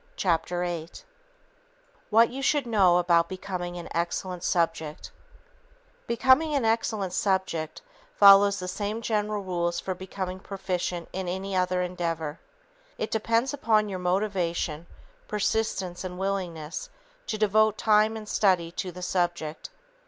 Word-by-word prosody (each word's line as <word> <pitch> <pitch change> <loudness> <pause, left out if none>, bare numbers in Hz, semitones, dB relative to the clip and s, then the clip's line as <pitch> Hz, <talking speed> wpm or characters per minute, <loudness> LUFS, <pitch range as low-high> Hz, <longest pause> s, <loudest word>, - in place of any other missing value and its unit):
Chapter 175 0 0
8 170 - -5 1.0
What 225 +2 +5
You 270 +2 -5
Should 285 0 +2
Know 195 -7 +4
About 170 -1 +3
Becoming 185 -2 -5
An 170 - -7
Excellent 175 +1 -2
Subject 165 -3 -1 1.0
Becoming 260 +6 +3
an 270 -5 +1
excellent 220 -4 0
subject 185 -6 -1 0.3
follows 200 0 +7
the 180 -2 -5
same 210 +4 -3
general 210 -2 -1
rules 175 -2 -1
for 185 - -3
becoming 185 0 -5
proficient 180 -3 -3
in 190 -1 -3
any 190 +2 -3
other 180 0 +1
endeavor. 165 -4 -3 0.6
It 215 - -3
depends 230 +4 +1
upon 220 -6 +2
your 190 -2 -4
motivation, 180 -4 -1 0.4
persistence 210 -4 -1
and 180 -1 -6
willingness 185 - -3 0.4
to 215 - -2
devote 215 0 +3
time 215 0 +3
and 215 -1 -9
study 185 -6 +2
to 180 +1 -4
the 180 +1 -9
subject. 175 - -2
185 Hz, 130 wpm, -27 LUFS, 175-215 Hz, 1.0 s, follows